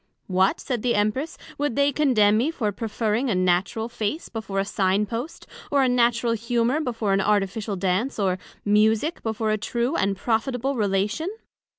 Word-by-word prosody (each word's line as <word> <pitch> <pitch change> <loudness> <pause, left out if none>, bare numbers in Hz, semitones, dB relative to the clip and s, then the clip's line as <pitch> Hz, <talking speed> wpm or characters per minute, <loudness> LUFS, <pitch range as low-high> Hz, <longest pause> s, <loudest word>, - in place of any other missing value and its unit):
What, 185 +1 +2
said 245 -4 -3
the 245 0 +1
Empress, 215 +10 -1 0.2
would 290 -4 0
they 280 +1 +3
condemn 240 -8 +3
me 240 +8 +2
for 230 -10 -1
preferring 220 +4 -1
a 210 - +1
natural 185 +5 +1
Face 240 +6 -3
before 210 -4 -5
a 195 - +1
Sign 200 0 +1
post; 235 - -6 0.2
or 280 -1 +3
a - - +3
natural 240 -1 +2
Humour 235 +4 0
before 225 -7 -1
an 195 - +2
artificial 205 0 0
Dance; 195 +7 -1
or 190 -3 0 0.3
Musick 215 +9 +2
before 220 -1 -1
a 215 - 0
true 240 +7 -1
and 195 -5 0
profitable 245 +5 -1
Relation? 210 - 0
220 Hz, 170 wpm, -24 LUFS, 205-245 Hz, 0.3 s, they